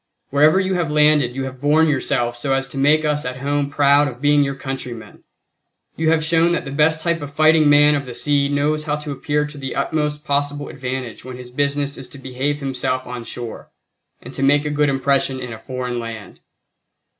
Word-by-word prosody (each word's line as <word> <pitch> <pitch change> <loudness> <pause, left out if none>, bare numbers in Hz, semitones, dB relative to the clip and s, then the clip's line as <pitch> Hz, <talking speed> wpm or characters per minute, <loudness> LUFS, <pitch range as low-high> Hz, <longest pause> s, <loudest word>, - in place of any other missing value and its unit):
Wherever 150 +6 +5
you 190 0 0
have 175 -4 -1
landed 150 -4 +3
you 135 - -2
have 130 -1 -7
borne 155 +3 +4
yourselves 120 -4 -1
so 135 +2 0
as 135 0 -1
to - - -8
make 155 +3 +3
us 150 -1 0
at 125 +1 -5
home 140 +1 -1
proud 145 0 +4
of 125 -3 -7
being 145 +1 +4
your 140 0 -2
countrymen. 130 -4 -7 0.7
You 160 0 +1
have 160 -1 +2
shown 165 +2 +3
that 170 - -2
the 135 - -6
best 155 +2 +2
type 170 -1 0
of 145 -1 -7
fighting 155 0 +4
man 145 +1 +6
of 140 -2 -2
the 125 - -7
sea 145 -1 +1
knows 150 +2 0
how 150 -1 0
to 150 -1 -6
appear 150 +2 -1
to 150 0 -9
the 135 -1 -5
utmost 150 -1 -1
possible 145 0 -1
advantage 130 -3 -5
when 130 -1 -8
his 125 -1 -10
business 140 +1 -1
is 130 - -8
to 140 - -12
behave 135 +3 -3
himself 130 -1 -2
on 125 -1 -6
shore, 120 -1 -7 0.5
and - - -10
to - - -4
make 145 +2 +3
a 150 - -1
good 150 0 +2
impression 135 -1 +1
in 125 -2 -6
a 110 - -9
foreign 125 0 -4
land. 115 -4 -8
145 Hz, 215 wpm, -20 LUFS, 130-150 Hz, 0.7 s, man